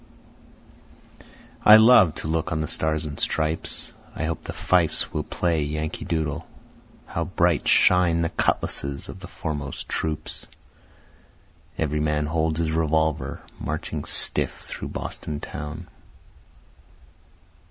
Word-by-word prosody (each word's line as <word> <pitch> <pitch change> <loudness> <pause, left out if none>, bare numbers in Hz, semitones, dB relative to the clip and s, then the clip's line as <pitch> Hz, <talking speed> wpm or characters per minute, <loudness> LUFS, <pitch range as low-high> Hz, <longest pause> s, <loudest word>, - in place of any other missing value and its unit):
I 105 - +10
love 110 -7 +7
to - - -4
look 80 +3 -1
on 80 - 0
the 80 - -2
Stars 80 +1 -1
and 75 -1 -6
Stripes, 80 +1 0 0.2
I - - -3
hope 80 +1 -3
the - - -5
fifes 90 -3 +2
will - - 0
play 85 -3 0
Yankee 75 +2 -3
Doodle. 80 -1 -2 0.6
How - - -3
bright - - +1
shine 85 -2 +4
the 85 - 0
cutlasses 70 0 -1
of - - -8
the 95 - -9
foremost 75 -7 -5
troops! 80 -1 -3 1.3
Every 75 -1 0
man 75 0 +1
holds 80 0 0
his 80 -1 0
revolver, 80 -1 0 0.2
marching 80 +1 -4
stiff - - 0
through - - -6
Boston 75 -1 -5
town. 75 +1 -7
80 Hz, 120 wpm, -24 LUFS, 75-85 Hz, 1.3 s, I